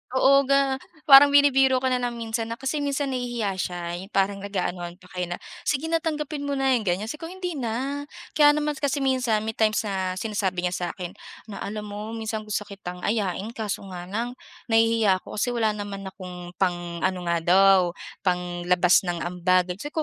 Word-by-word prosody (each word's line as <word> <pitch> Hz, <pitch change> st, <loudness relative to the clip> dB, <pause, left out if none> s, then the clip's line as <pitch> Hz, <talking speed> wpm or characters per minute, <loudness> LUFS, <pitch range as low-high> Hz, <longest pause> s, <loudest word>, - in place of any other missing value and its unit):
Oo 275 Hz, +1 st, +5 dB
ga 275 Hz, -1 st, +2 dB, 0.2 s
parang 275 Hz, -1 st, +10 dB
binibiro 270 Hz, -2 st, +5 dB
ka 260 Hz, -, +2 dB
na 250 Hz, -, +2 dB
lang 245 Hz, -1 st, -2 dB
minsan 225 Hz, 0 st, -3 dB
na 230 Hz, -, -4 dB
kasi 270 Hz, +3 st, -2 dB
minsan 280 Hz, -1 st, -1 dB
nahihiya 240 Hz, -5 st, -2 dB
siya. 175 Hz, 0 st, -2 dB, 0.2 s
Yung 195 Hz, +3 st, -10 dB
parang 195 Hz, 0 st, +1 dB
nag-aanuhan 180 Hz, -3 st, -3 dB
pa 180 Hz, -, -17 dB
kayo 180 Hz, -1 st, -4 dB
na, -, -, -16 dB, 0.3 s
sige 300 Hz, +2 st, 0 dB
na 330 Hz, -, +3 dB
tanggapin 300 Hz, -2 st, -3 dB
mo -, -, -1 dB
na, 270 Hz, -1 st, +2 dB
'yong 235 Hz, -, -1 dB
ganyan. 185 Hz, +4 st, 0 dB
Sabi 300 Hz, -, -8 dB
ko, 330 Hz, -, -4 dB
"Hindi 360 Hz, -3 st, -4 dB
na." 260 Hz, +5 st, -2 dB, 0.3 s
Kaya 295 Hz, -1 st, +7 dB
naman 300 Hz, 0 st, 0 dB
kasi 285 Hz, 0 st, 0 dB
minsan 255 Hz, -5 st, +2 dB
may 220 Hz, -, -2 dB
times 215 Hz, -1 st, +2 dB
na 190 Hz, -2 st, -2 dB
sinasabi 195 Hz, -5 st, -2 dB
niya 180 Hz, -, 0 dB
sa 175 Hz, -, -2 dB
akin 180 Hz, -2 st, -6 dB, 0.4 s
na, 200 Hz, -, -7 dB
"Alam 210 Hz, +1 st, -5 dB
mo 205 Hz, -, -6 dB, 0.2 s
minsan 220 Hz, -1 st, -3 dB
gusto 210 Hz, 0 st, -1 dB
kitang 180 Hz, -3 st, -8 dB
ayain 205 Hz, -1 st, -1 dB
kaso 215 Hz, -3 st, -3 dB
nga 175 Hz, -1 st, -6 dB
lang 230 Hz, +5 st, -2 dB, 0.4 s
nahihiya 225 Hz, -4 st, +4 dB
ako -, -, -9 dB
kasi 245 Hz, +3 st, +1 dB
wala 220 Hz, -2 st, +2 dB
naman 205 Hz, -1 st, -6 dB
akong" 180 Hz, -2 st, -9 dB
pang-ano 175 Hz, 0 st, -1 dB
nga 170 Hz, -, +2 dB
daw, 195 Hz, +2 st, +6 dB, 0.4 s
panglabas 180 Hz, -1 st, +2 dB
ng 175 Hz, -1 st, -1 dB
ambag. 180 Hz, +1 st, +1 dB
Sabi 295 Hz, +6 st, -6 dB
215 Hz, 190 wpm, -25 LUFS, 185-265 Hz, 0.4 s, parang